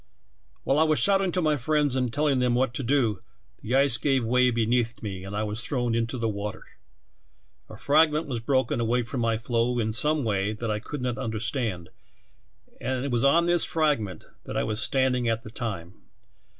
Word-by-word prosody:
"While 140 - +2
I - - +6
was 155 -1 +2
shouting 195 +8 +2
to 180 - 0
my 155 -1 +2
friends 145 +1 +1
and 125 -2 0
telling 145 0 +1
them 125 -1 +2
what 125 -1 +1
to 125 - -3
do, 120 -6 +1 0.4
the 120 +4 -2
ice 135 -3 +4
gave 135 -4 +1
way 125 +2 +3
beneath 115 0 0
me 95 -3 -5
and 100 +1 -7
I 105 - -1
was 105 +2 -3
thrown 120 -3 -1
into 115 +2 -1
the 115 -1 -1
water. 105 -1 -5 1.1
A - - -10
fragment 155 +2 +3
was 125 -4 -3
broken 130 +1 0
away 120 +1 +1
from 120 +2 -4
my 115 -1 +1
floe 120 +1 -1
in 110 -2 0
some 150 +7 +1
way 105 -2 0
that 110 +1 -3
I 105 - -1
could 125 +4 -6
not 125 -1 -2
understand, 110 - -3 0.9
and 130 0 -2
it 140 - -3
was 120 0 +1
on 165 +5 +4
this 175 -1 +4
frag 155 -5 +1
ment 95 -3 -7 0.2
that - - -5
I - - +1
was 110 +1 -1
standing 130 -3 +1
at 115 0 -1
the 110 - -10
time. 100 -8 -5
120 Hz, 200 wpm, -26 LUFS, 110-140 Hz, 1.1 s, I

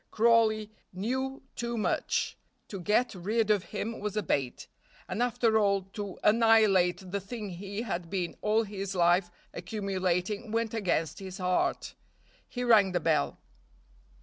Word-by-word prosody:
Crawley 220 -1 +3 0.2
knew 260 +8 -3
too 235 0 -3
much; 215 - 0 0.3
to 195 - -6
get 215 +7 +1
rid 215 +4 0
of 205 -3 +1
him 225 +2 -4
was 210 0 -4
a 210 - +1
bait; 135 -6 -1 0.4
and 230 - -3
after 230 -2 +2
all 200 -2 +2
to 205 -3 -5
annihilate 210 -5 +4
the 200 - -1
thing 210 +1 -6
he 200 +4 -5
had 175 -6 -4
been 180 -3 -2
all 215 +2 +2
his 195 -2 -5
life 175 +1 +3 0.2
accumulating 195 +2 -2
went 230 0 -1
against 175 -8 -1
his 190 -1 -7
heart. 180 -1 0 0.6
He 245 - -4
rang 210 -6 +5
the 175 - +2
bell. 160 -2 +1
205 Hz, 145 wpm, -29 LUFS, 185-225 Hz, 0.6 s, rang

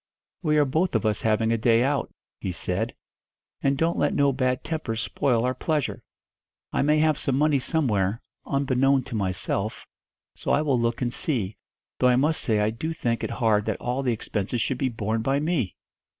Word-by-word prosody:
'We 155 -3 +2
are 150 - +5
both 160 +4 0
of 115 - +1
us 105 -1 +1
having 110 +1 +2
a 115 - +1
day 115 +1 +4
out,' 140 -1 0 0.3
he 95 - -3
said, 90 +6 -2 0.7
'and 135 0 +2
don't 165 +3 +1
let - - +1
no 140 -1 +3
bad 130 -1 0
tempers 140 -9 -3
spoil 120 +1 +1
our 125 - +1
pleasure. 150 +1 -1 0.7
I - - +2
may 150 +2 +3
have 155 -1 +3
some 135 -1 0
money 150 -1 +3
somewhere, 115 - 0 0.2
unbeknown 135 -1 +2
to 130 -2 -7
myself, 100 +1 -2 0.5
so - - -1
I 150 - +3
will 135 -5 +2
look 115 +1 0
and 120 0 -1
see; 110 - -1 0.4
though 125 - +4
I 125 - +4
must 150 +5 +2
say 110 -3 +1
I 105 +1 +2
do 160 +9 -3
think 120 -6 -1
it - - -1
hard 110 -3 +1
that - - -2
all 125 +2 -1
the 130 -3 +1
expenses 110 0 -2
should 125 +3 -1
be 135 - +1
borne 110 -1 -2
by 135 +4 +1
me!' 150 - -1
125 Hz, 195 wpm, -25 LUFS, 110-140 Hz, 0.7 s, are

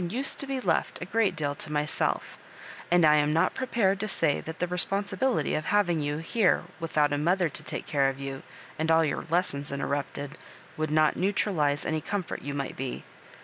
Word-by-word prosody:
used 260 +8 -1
to 280 - -3
be 270 -1 -2
left - - 0
a - - -5
great 200 -1 +1
deal 145 -3 -1
to 150 - -7
myself; 150 0 0 0.5
and 175 -1 +5
I 150 0 +6
am 150 0 +2
not 160 +2 +2
prepared 220 -7 +1
to 215 - -2
say 150 -7 +1
that 160 0 -7
the 180 - 0
responsibility 200 +7 0
of 155 - -1
having 180 -5 +2
you 145 0 -1
here 185 +5 +2 0.2
without 150 -3 +1
a 145 - 0
mother 175 +2 +2
to - - -1
take - - -4
care 140 -2 +2
of 135 0 -6
you, 135 -1 -5 0.4
and 160 +1 0
all 160 0 +5
your 145 - -2
lessons 150 -5 0
interrupted, 140 +1 -3 0.4
would 155 -1 -2
not 155 0 +3
neutralize 180 -7 +1
any 155 -1 -1
comfort 200 +1 -3
you 145 0 -5
might 140 -1 -3
be. 130 -1 -4
160 Hz, 195 wpm, -28 LUFS, 145-195 Hz, 0.5 s, I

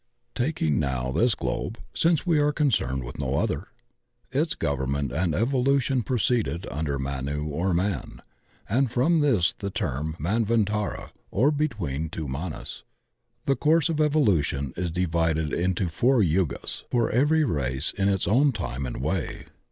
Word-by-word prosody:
Taking 125 - 0
now 65 -3 -1
this 115 - +3
globe 115 - -3
— - - -35
since 165 -1 +2
we 165 -4 +3
are 145 0 +3
concerned 110 - 0
with - - -8
no 70 -1 -1
other - - -1 0.3
— - - -38
^its - - 0
government 70 -1 -1
and 80 +3 0
evolution 130 - +2
proceed 115 -6 0
under 75 -2 -2
Manu 70 +2 -3
or 80 +6 -1
man, 95 +3 -1 0.5
and 130 +4 +2
from 140 +8 +2
this 115 - +3
is - - -7
the 100 - -3
term 80 -3 -2
Man 105 +10 0
vantara 105 -2 -1 0.2
or 135 +9 +3
"between 100 - -2
two 80 -2 -5
Manus/' 75 +3 -5 0.6
The 135 - +3
course 160 +5 +3
of 155 -2 0
evolution 95 - +2
is 90 0 -2
divided 80 -3 0
into 90 +1 0
four 115 +8 +3
Yugas 85 -6 -1
for 120 -2 +1
every 150 +6 +3
race 70 - -1
in 100 -1 +2
its 95 -3 0
own 135 +7 +4
time 70 - -3
and 60 +1 -5
way. 80 +4 -2
95 Hz, 160 wpm, -26 LUFS, -, 0.6 s, own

